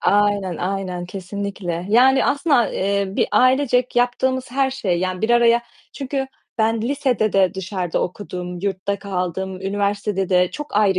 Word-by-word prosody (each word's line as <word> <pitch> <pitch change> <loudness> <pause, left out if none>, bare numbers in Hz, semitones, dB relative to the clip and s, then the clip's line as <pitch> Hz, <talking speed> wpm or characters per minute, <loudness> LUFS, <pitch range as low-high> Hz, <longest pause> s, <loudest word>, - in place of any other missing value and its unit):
Aynen, 205 -4 +2
aynen 185 -1 -3
kesinlikle! 185 -2 -5
Yani, 255 +5 +5
aslında 285 +2 +2
a 240 - +3
eee, 200 +1 0
bir 195 - 0
ailecek 250 +1 +3
yaptığımız 255 +1 +1
her 270 +1 +1
şey, 210 -10 -1
yani, 185 +2 -2
bir 225 - +1
araya 235 0 +4 0.3
Çünkü 270 -1 -3 0.3
ben 220 0 +1
lisede 250 -5 0
de 190 -1 +3
dışarıda 185 -2 -2
okudum, 180 -1 -5
yurtta 200 +1 -2
kaldım, 190 -1 -3
üniversitede 200 0 -1
de 180 -1 +3
çok 295 -7 -6
ayrı 200 -3 +3
200 Hz, 150 wpm, -21 LUFS, 185-245 Hz, 0.3 s, Yani